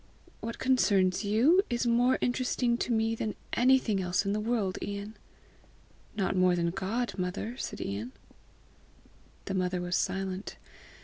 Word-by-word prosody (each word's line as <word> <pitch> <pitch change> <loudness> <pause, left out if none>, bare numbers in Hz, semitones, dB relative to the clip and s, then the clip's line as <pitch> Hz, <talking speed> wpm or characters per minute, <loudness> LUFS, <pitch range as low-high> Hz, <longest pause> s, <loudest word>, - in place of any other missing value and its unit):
"What 230 +1 -5
concerns 200 -8 +2
you 240 - +4
is 240 0 0
more 240 +2 +3
interesting 245 -1 +1
to 240 - -2
me 225 0 +2
than 220 -1 -3 0.2
anything 245 -5 +3
else 180 +2 0
in 200 - 0
the 210 - -1
whole 220 - -4
world, 205 -6 0
Ian." 205 +1 -5 1.0
"Not 195 -2 0
more 185 -1 +4
than 170 -1 0
God, 225 +7 -2
mother?" 185 +6 -3
said - - -5
Ian. 105 +5 -4 1.3
The 195 - -3
mother 180 -1 0
was 175 0 -2
silent. 190 +1 -2
205 Hz, 145 wpm, -29 LUFS, 185-240 Hz, 1.3 s, you